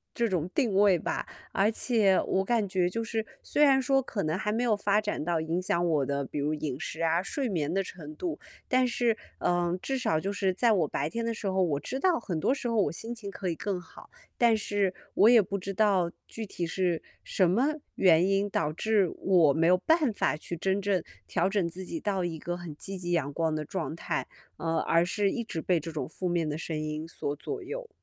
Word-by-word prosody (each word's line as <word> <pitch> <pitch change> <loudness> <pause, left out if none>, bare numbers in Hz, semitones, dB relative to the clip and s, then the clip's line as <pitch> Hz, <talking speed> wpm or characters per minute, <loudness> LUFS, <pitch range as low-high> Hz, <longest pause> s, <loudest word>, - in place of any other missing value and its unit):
这 235 - +2
种 175 -4 0
定 240 -8 +2
位 200 -2 +5
吧。 - - -2 0.3
而 200 +3 +3
且 215 -5 +3
我 190 0 +1
感 225 -1 +1
觉 185 -2 +1
就 230 +5 -2
是 225 0 -2 0.2
虽 295 - +2
然 275 -2 +6
说 270 +1 +3
可 225 -5 -3
能 155 +1 0
还 210 +1 -1
没 230 +3 0
有 230 -3 +3
发 205 0 +2
展 210 -7 -2
到 170 0 0
影 165 +3 -1
响 175 -1 +1
我 150 -5 +2
的 140 +1 -1
比 145 - -5
如 150 +2 0
饮 145 -3 -4
食 165 -1 -5
啊， 165 +1 +2
睡 275 +6 -2
眠 160 -6 -1
的 195 +1 +1
程 155 -5 -9
度， 335 - -4 0.3
但 255 0 +3
是， 240 -1 +1 0.2
嗯， 175 0 +1
至 270 - -1
少 160 -11 +1
就 195 +5 -2
是 200 -2 +1
在 230 +5 +3
我 175 -7 +2
白 145 +1 -2
天 230 +6 -3
的 230 - -1
时 220 - -7
候， 190 0 +1
我 150 -5 0
知 265 - -4
道 360 -1 +3
很 180 -8 -3
多 250 - +2
时 270 - -3
候 230 - -1
我 - - -1
心 225 +7 -4
情 215 -4 -7
可 190 -1 -4
以 165 - -1
更 195 +2 -2
好， - - -15 0.3
但 235 -2 +5
是 205 -3 0 0.2
我 215 - +7
也 235 -2 +8
不 200 0 -3
知 195 +2 -5
道 190 -4 +2 0.2
具 225 - -6
体 180 -3 -4
是 175 -1 0 0.2
什 185 -3 +2
么 225 +9 +3 0.3
原 180 -1 +5
因 195 +1 +2
导 150 -5 0
致 200 +2 +2
我 170 -7 +4
没 160 +2 +2
有 180 +1 +6
办 315 - +3
法 200 - +1
去 175 - -5
真 190 +4 0
正 195 -2 +1 0.2
调 - - +1
整 195 -4 +1
自 185 +3 -7
己 325 - -4
到 200 -7 -1
一 170 -2 -3
个 175 +3 -3
很 175 -4 -8
积 195 +5 -3
极、 175 -1 -3
阳 145 -5 0
光 160 0 0
的 155 0 -3
状 165 0 -4
态， 170 -2 -3 0.3
呃， 165 0 -1
而 165 0 +3
是 200 +2 +1
一 235 - -2
直 165 -7 -4
被 175 0 +2
这 165 +2 -6
种 155 - -3
负 180 +3 -4
面 170 -2 0
的 150 0 -2
声 160 -1 -4
音 155 +1 -4
所 145 -3 -4
左 410 - -5
右。 475 +5 -6
190 Hz, 255 characters per minute, -29 LUFS, 165-220 Hz, 0.3 s, 也